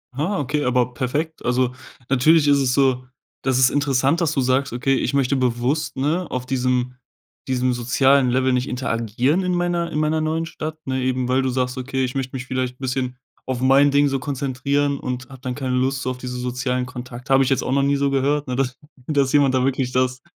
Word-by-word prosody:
Ah, 180 +8 -1
okay, 145 +2 -1
aber 125 -1 +1
perfekt. 145 +6 -3
Also 125 0 +1 0.3
natürlich 145 +4 +4
ist 140 -1 +5
es 130 -2 +1
so 130 -2 +2 0.4
das 130 -2 +2
ist 130 - +5
interessant, 140 +3 +1
dass 165 -2 +1
du 135 - +1
sagst: 130 +2 +1
„Okay, 125 +3 +1
ich - - -1
möchte 140 0 +2
bewusst, 130 +4 -1
ne, 160 +6 0
auf 125 0 -3
diesem 125 -1 0 0.5
diesem 130 -1 +1
sozialen 130 +2 +3
Level 130 +1 +2
nicht 125 +2 0
interagieren 125 - 0
in 180 0 0
meiner 175 -1 -1
in 150 - -1
meiner 155 +1 +1
neuen 160 +1 -1
Stadt“, 155 -1 -6
ne? 130 0 -2
Eben 130 -1 -1
weil 130 +1 +2
du 130 - 0
sagst: 125 0 -1
„Okay, 130 +1 -2
ich 125 - -5
möchte 135 -1 -3
mich 130 - -5
vielleicht 130 -1 -3
bisschen 130 -1 -3 0.3
auf 130 -2 -2
mein 135 +2 +5
Ding 145 +1 +4
so 135 -1 -1
konzentrieren 140 +1 -1
und 125 0 -5
habe 130 -1 -12
dann 125 -1 -4
keine 130 -2 -2
Lust 130 +1 0
auf 130 0 -3
diese 125 0 -5
sozialen 125 0 -2
Kontakte“. 125 +1 -5
Habe 135 0 +5
ich 130 - 0
jetzt 135 - +1
auch - - -3
noch 140 - +3
nie 140 +1 +2
so 140 0 +1
gehört, 140 +1 +1
ne? 125 - -2
Dass 130 -1 -1 0.3
dass 140 -3 +1
jemand 140 -3 +4
da 130 - +2
wirklich 130 -1 -1
das 130 0 0
130 Hz, 215 wpm, -21 LUFS, 125-140 Hz, 0.5 s, ist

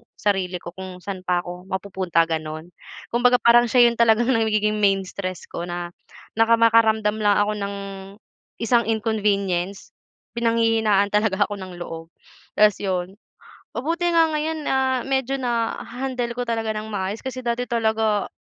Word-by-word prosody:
sarili 190 -3 -1
ko 170 - -7
kung 185 0 -9
saan 185 -2 -7
pa 175 -1 +1
ako 180 +1 -9
mapupunta, 190 -3 0
gano'n. 160 +1 -5 0.4
Kumbaga 245 +1 +4
parang 240 0 +5
siya 245 +1 +5
yun 235 - -9
talagang 235 +2 +4
nagiging 215 -2 +1
main 195 -1 +3
stress 185 -1 -6
ko 170 +1 -5
na 175 0 -5 0.5
naka 225 +1 +5
makaramdam 220 -2 +3
lang 205 -1 +3
ako 205 0 +2
ng 200 0 -3 0.9
isang 235 -1 +2
inconvenience, 200 -4 -1 0.4
pinanghihinaan 225 -3 +2
talaga 210 -1 +2
ako 205 - -6
ng 185 -1 -8
loob. 165 -1 -7 0.5
Tapos 210 -1 +5
'yon, 185 -1 -2 0.6
mabuti 335 +7 -1
nga 330 -1 +4
ngayon, 315 +1 -2
ah, 260 -1 +1
medyo 270 0 0
na-handle 245 0 -3
ko 245 - -2
talaga 225 -2 -1
ng 215 +1 -5
maayos. 200 +1 -3
Kasi 260 -1 -5
dati 235 +1 -1
talaga 220 -3 0
215 Hz, 145 wpm, -22 LUFS, 190-235 Hz, 0.9 s, parang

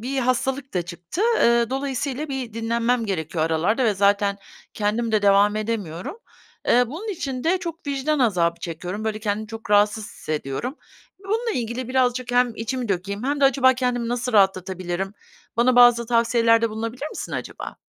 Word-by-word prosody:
bir 265 +4 -3
hastalık 260 0 -1
da 180 - +1
çıktı. 175 - -5 0.2
Eee, 235 0 +3
dolayısıyla 270 +2 -2
bir 265 -4 -4
dinlenmem 230 +1 0
gerekiyor 160 -4 -1
aralarda 170 +10 +1
ve 215 -3 +2
zaten 200 0 +2 0.4
kendim 220 +2 -1
de 215 -1 +2
devam 200 +1 +4
edemiyorum. 215 - -4 0.5
Eee, 245 +1 +5
bunun 345 - -7
için 275 -10 -4
de 355 +3 +2
çok 335 -3 -7
vicdan 285 +2 0
azabı 175 -8 +1
çekiyorum. 180 +5 -5
Böyle, 215 -1 -2
kendimi 210 0 -2
çok 225 -1 -9
rahatsız 210 +1 +3
hissediyorum. 155 - -4 0.4
Bununla 445 +4 -1
ilgili 240 +1 -3
birazcık 255 -1 0
hem 245 -1 +3
içimi 245 +1 -3
dökeyim 200 +3 -2
hem 285 +2 -1
de - - +5
acaba 260 -1 +5
kendimi 245 -2 -1
nasıl 245 +1 -2
rahatlatabilirim? 190 -1 +1 0.4
Bana 245 +2 +3
bazı 240 -1 +6
tavsiyelerde 230 -1 +3
bulunabilir 230 +6 -4
misin, - - -6
acaba? - - -6
230 Hz, 155 wpm, -23 LUFS, 205-255 Hz, 0.5 s, bazı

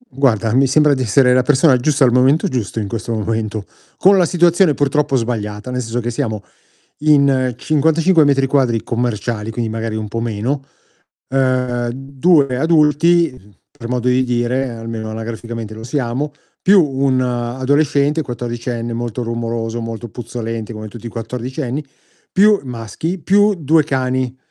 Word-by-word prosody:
Guarda, 130 - 0
mi 135 +2 +4
sembra 150 +2 +4
di 130 - -1
essere 125 +2 +4
la 130 - +4
persona 135 +2 +4
giusta 140 +3 +1
al 125 - +5
momento 135 +9 +3
giusto 115 - -3
in 105 - -3
questo 115 +2 -4
momento, 110 -1 -2 0.3
con 195 +1 +5
la 180 - +4
situazione 175 -1 +3
purtroppo 145 0 +1
sbagliata, 110 -2 -3
nel 125 0 -2
senso 115 0 -3
che, 120 - -3
siamo 110 -5 -3 0.6
in 140 -4 +3
55 160 +4 +3
metri 135 -1 +2
quadri 130 -5 +1
commerciali, 115 -2 -2
quindi 115 0 -3
magari 110 0 -3
un 110 -1 -4
po' 115 +2 -4
meno, 120 +5 -2 0.6
ehm, 125 -2 0
2 135 +1 +1
adulti, 155 - +2 0.2
per 115 - -9
modo 125 0 -1
di 125 +1 +2
dire 125 +2 -1
almeno 115 -1 -6
anagraficamente 115 0 -6
lo 110 +1 -9
siamo, 130 +3 -2 0.3
più 195 -1 +5
un 135 -2 0
adolescente 140 +5 0
quattordicenne 120 -1 -4
molto 120 +1 -4
rumoroso, 115 0 -3
molto 115 +1 -6
puzzolente, 115 -1 -6
come 110 0 -7
tutti 115 +2 -10
i - - -3
quattordicenni, 125 +4 -4 0.5
più 205 +1 +4
maschi, 125 - -5
più 205 +4 +3
2 155 -1 +2
cani. 130 -2 -1
125 Hz, 150 wpm, -17 LUFS, 115-145 Hz, 0.6 s, al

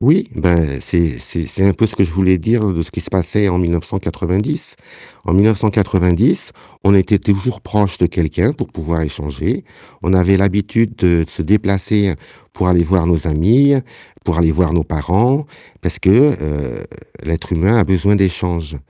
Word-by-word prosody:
Oui, 155 +10 +3
ben 80 -7 +1
c'est 80 -8 -1
c'est 85 - -6
c'est 95 - -2
un 100 - +5
peu 115 - +1
ce - - -9
que - - +1
je 90 - 0
voulais 95 +2 +2
dire, 110 +7 0
hein, 100 - 0
de 85 -1 -2
ce 85 - -11
qui - - -6
se - - -10
passait 95 +3 0
en 90 -1 0
1990. 90 +2 -2 0.5
En - - -1
1990, 100 -3 +2 0.3
on 100 - +5
était 100 +2 +3
toujours 100 +5 -1
proche 105 -3 -1
de 90 - +3
quelqu'un 85 -3 0
pour - - -5
pouvoir 80 0 -3
échanger. 75 -3 -4 0.4
On 90 - 0
avait 95 +1 +4
l'habitude 105 +4 0
de 85 -4 +2
se - - -6
déplacer 100 +1 +1 0.4
pour 90 - -2
aller 90 -1 +3
voir 85 0 +1
nos 85 -1 0
amis, 115 - +4 0.5
pour - - -1
aller 85 -1 +3
voir 85 +1 +1
nos 85 -2 +2
parents, 100 - 0 0.3
parce - - -4
que, 95 - +3 0.3
heu 75 -5 -5 0.4
l'être 80 +2 -4
humain 95 +7 +2
a 105 - +4
besoin 95 +2 +2
d'échanges. 85 -5 -2
90 Hz, 175 wpm, -16 LUFS, 85-100 Hz, 0.5 s, un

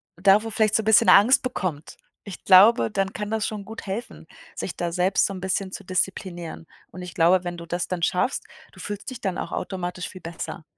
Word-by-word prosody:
davor 200 +5 +3
vielleicht 215 -1 +1
so 220 - +2
'n - - -12
bisschen 220 -1 +5
Angst 225 +7 +6
bekommt, 185 - -4 0.3
ich 200 - -10
glaube, 200 +5 +6
dann 195 -2 -1
kann 210 +1 -5
das 220 0 -1
schon 210 -2 -5
gut 220 +1 -9
helfen, 200 +5 -6 0.3
sich 180 - -5
da 170 -1 -2
selbst 185 +2 +2
so 195 - -3
'n 185 - -8
bisschen 190 0 -2
zu - - -7
disziplinieren. 175 -2 -4 0.3
Und 185 - -9
ich 180 -1 -8
glaube, 175 +2 +3
wenn 175 0 -5
du 170 - -9
das 175 +1 -3
dann 175 -2 -3
schaffst, 185 +9 0 0.3
du - - -17
fühlst 205 +3 -6
dich 255 -2 -8
dann 190 -2 -3
auch - - -5
automatisch 180 -1 -4
viel 185 - -11
besser. 165 -1 -7
190 Hz, 215 wpm, -24 LUFS, 180-210 Hz, 0.3 s, Angst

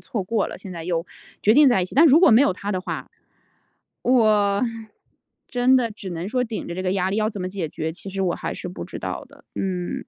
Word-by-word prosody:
错 215 - -4
过 210 +2 0
了， - - -8
现 195 - -9
在 165 -2 -7
又 170 -1 -1 0.4
决 210 - +5
定 290 +1 +7
在 215 -7 +3
一 - - 0
起。 180 - -9
但 310 +6 +7
如 305 +2 +6
果 370 - +7
没 225 +2 +7
有 235 - +3
他 200 +3 -5
的 185 -3 -1
话， 185 - -5 0.9
我 215 -4 +3 0.9
真 250 +1 +3
的 240 -3 +1
只 205 -3 -8
能 175 +2 -4
说 250 +2 0
顶 225 -2 -5
着 170 - -4
这 185 - -4
个 185 0 0
压 190 -1 0
力 200 - -1
要 215 0 +1
怎 205 - -7
么 185 - -2
解 185 -4 -4
决？ 160 +1 -4
其 175 - -10
实 195 0 -2
我 180 -2 +1
还 - - -4
是 - - -6
不 180 - -7
知 - - -8
道 - - -5
的。 - - -19
嗯。 180 -2 -3
200 Hz, 275 characters per minute, -23 LUFS, 180-230 Hz, 0.9 s, 定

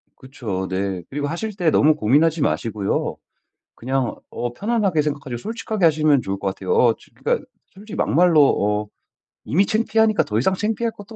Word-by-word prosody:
그쵸. 110 -9 -5
네. 95 -1 -2
그리고 145 +1 -3
하실 205 +7 -4
때 175 -5 +2
너무 155 +1 +4
고민하지 150 +6 +2
마시고요 105 -7 -1 0.6
그냥 130 +1 -2 0.2
어 120 0 -4
편안하게 200 - 0
생각하시고 140 -4 -4
솔직하게 220 - -3
하시면 155 -4 +4
좋을 95 -1 -3
것 100 - -2
같아요. 275 - -3
어 460 - +4
저 - - -21
그러니까 465 - -1 0.2
솔직히 205 +2 -11
막말로 165 0 +4 0.4
어 - - -21 0.6
이미 190 +7 +2
창피하니까 220 -1 +2
더 105 - -3
이상 185 +11 +2
창피할 220 +3 -1
것도 210 +2 -12
155 Hz, 385 characters per minute, -21 LUFS, -, 0.6 s, 너무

